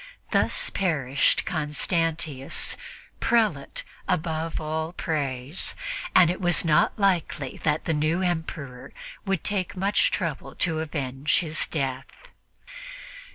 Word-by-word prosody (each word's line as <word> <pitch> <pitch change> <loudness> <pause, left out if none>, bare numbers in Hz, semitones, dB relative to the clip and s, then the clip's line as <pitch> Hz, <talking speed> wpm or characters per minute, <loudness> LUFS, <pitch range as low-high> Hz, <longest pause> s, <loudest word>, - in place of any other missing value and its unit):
Thus - - +2
perished 140 -8 +2
Constantius' 155 -2 0 0.4
"prelate 215 -12 +1 0.2
above 165 -2 -1
all 160 +2 -3
praise," 140 -3 -1 0.4
and 175 -2 +7
it 185 - -5
was 175 -1 +3
not 155 -2 +3
likely 175 -9 0
that 150 0 +1
the 165 - +1
new 155 +4 +1
Emperor 160 -7 -3 0.3
would 195 -3 0
take 195 -2 -1
much 195 +2 +3
trouble 155 -7 -3
to 165 -3 0
avenge 145 -2 0
his 155 -2 0
death. 135 -3 -2
160 Hz, 110 wpm, -26 LUFS, 145-175 Hz, 0.4 s, and